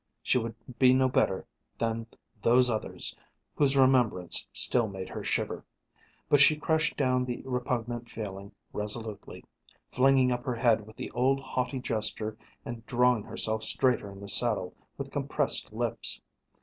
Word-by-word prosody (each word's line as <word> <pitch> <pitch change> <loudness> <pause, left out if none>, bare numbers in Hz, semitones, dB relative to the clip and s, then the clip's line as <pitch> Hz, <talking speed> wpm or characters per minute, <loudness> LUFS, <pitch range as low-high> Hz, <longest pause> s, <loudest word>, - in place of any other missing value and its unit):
She 125 - +2
would 115 -1 -5 0.2
be 130 -1 +6
no 130 0 +3
better 95 -6 +1 0.3
than 115 0 -2 0.3
"those 125 +2 +5
others" 110 - -2 0.4
whose 140 -2 +2
remembrance 125 -9 +3
still 120 -3 +3
made 95 -2 -7
her - - -6
shiver. - - -2 0.6
But 145 - +4
she 145 +2 +7
crushed 160 +1 0
down 130 -2 +2
the 125 -1 -5
repugnant 120 -2 -3
feeling 100 -3 -7 0.2
resolutely, 105 0 -4 0.5
flinging 130 0 +4
up 120 0 -2
her 125 -3 -2
head 115 -2 +2
with 110 - -14
the - - -6
old 130 +3 +2
haughty 130 0 -3
gesture 110 -3 -2 0.3
and 120 -1 -7
drawing 125 -2 +3
herself 110 +1 -2
straighter 125 -6 +1
in 100 - -12
the 100 - -8
saddle 105 -3 +1 0.2
with - - -6
compressed - - -1
lips. - - -1
120 Hz, 150 wpm, -29 LUFS, 110-130 Hz, 0.6 s, she